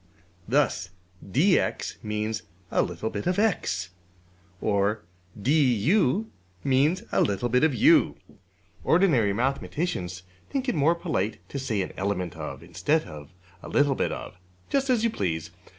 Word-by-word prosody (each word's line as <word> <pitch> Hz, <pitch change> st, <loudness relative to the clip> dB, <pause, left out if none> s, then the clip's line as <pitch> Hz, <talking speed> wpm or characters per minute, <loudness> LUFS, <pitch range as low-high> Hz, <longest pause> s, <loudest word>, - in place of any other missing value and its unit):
'' 90 Hz, 0 st, -32 dB
Thus 95 Hz, -11 st, +1 dB, 0.3 s
$dx$ 155 Hz, -, +1 dB
means 110 Hz, +1 st, -2 dB, 0.3 s
a -, -, +3 dB
little 90 Hz, +6 st, -3 dB
bit 100 Hz, -, -4 dB
of~$x$; 180 Hz, -, 0 dB, 0.7 s
or 105 Hz, +1 st, +1 dB, 0.4 s
$du$ 145 Hz, -, +3 dB, 0.4 s
means 145 Hz, -, +2 dB
a -, -, +3 dB
little 100 Hz, +4 st, +1 dB
bit 125 Hz, +3 st, +3 dB
of~$u$. 260 Hz, -, +5 dB, 0.7 s
Ordinary 155 Hz, -, +4 dB
mathematicians 120 Hz, -, -2 dB, 0.3 s
think 270 Hz, -1 st, -2 dB
it -, -, +2 dB
more 160 Hz, +2 st, +3 dB
polite 105 Hz, -, -2 dB
to 140 Hz, -, -4 dB
say 115 Hz, -7 st, -1 dB
``an -, -, -14 dB
element 95 Hz, -3 st, -2 dB
of,'' 75 Hz, -2 st, -7 dB
instead 145 Hz, -, 0 dB
of 75 Hz, -1 st, -10 dB, 0.3 s
``a -, -, -9 dB
little 145 Hz, -1 st, +3 dB
bit -, -, -1 dB
of.'' -, -, -7 dB, 0.3 s
Just 275 Hz, -1 st, +1 dB
as 240 Hz, -3 st, +3 dB
you 230 Hz, -, +2 dB
please. 85 Hz, -, -2 dB
120 Hz, 135 wpm, -26 LUFS, -, 0.7 s, of~$u$